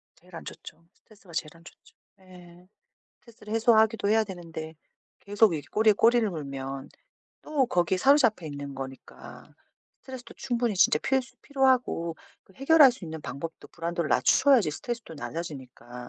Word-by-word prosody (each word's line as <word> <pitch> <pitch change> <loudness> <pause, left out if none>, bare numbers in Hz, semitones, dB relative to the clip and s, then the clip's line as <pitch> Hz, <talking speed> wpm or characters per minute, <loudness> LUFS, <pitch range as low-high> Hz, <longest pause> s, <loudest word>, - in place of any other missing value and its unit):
제일 180 0 -17
안 - - -8
좋죠. 165 - -11
스트레스가 200 -5 -20
제일 155 -1 -3
안 165 - -20
좋죠. 175 - -18 0.3
예. 180 -1 -16 0.5
스트레스를 220 -2 -11
해소하기도 220 -2 +3
해야 220 0 +3
되는데 165 -4 -8 0.4
계속 205 -1 +2
이렇게 145 -3 -5
꼬리에 215 0 +4
꼬리를 230 +1 +3
물면 135 -4 -6 0.5
또 290 -4 0
거기에 180 -3 0
사로잡혀 245 - +3
있는 140 -1 -7
거니까 135 0 -10 0.6
스트레스도 260 -3 -10
충분히 240 -4 -2
진짜 165 -4 +4
필수 265 -1 -1
필요하고 255 - +1 0.3
그 - - -23
해결할 275 - +6
수 235 - -11
있는 160 -1 -7
방법도 160 +4 -8
불안도를 170 -1 -4
낮춰야지 255 - +4
스트레스도 235 +1 -6
낮아지니까 130 -6 -8
185 Hz, 375 characters per minute, -27 LUFS, 160-235 Hz, 0.6 s, 해결할